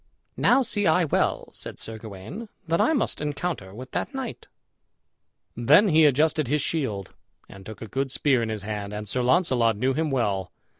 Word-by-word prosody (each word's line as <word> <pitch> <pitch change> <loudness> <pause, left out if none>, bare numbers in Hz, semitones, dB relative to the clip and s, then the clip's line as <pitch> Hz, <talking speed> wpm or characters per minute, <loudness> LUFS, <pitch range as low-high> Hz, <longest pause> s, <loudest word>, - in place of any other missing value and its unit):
"Now 265 +2 +4
see 205 -4 0
I 170 +2 +4
well," 150 - 0
said - - -8
Sir 110 0 -5
Gawain, 110 - -8 0.2
"that 165 +1 +2
I - - +3
must 275 - 0
encounter 150 - -3
with 125 +6 -10
that 275 - -3
knight." 265 -3 -6 1.1
Then 150 - +5
he 160 -1 +5
adjusted 150 +1 +3
his 150 +3 +1
shield, 110 - -2 0.3
and 95 -1 -13
took 110 +1 -8
a - - -7
good 135 +4 -2
spear 130 -2 +2
in 115 - -2
his 110 -3 -4
hand, 105 -1 -4
and 105 0 -5
Sir 125 +5 -1
Launcelot 125 - +2
knew 130 +5 +1
him 155 +2 0
well. 105 -8 -1
130 Hz, 185 wpm, -25 LUFS, 110-160 Hz, 1.1 s, Then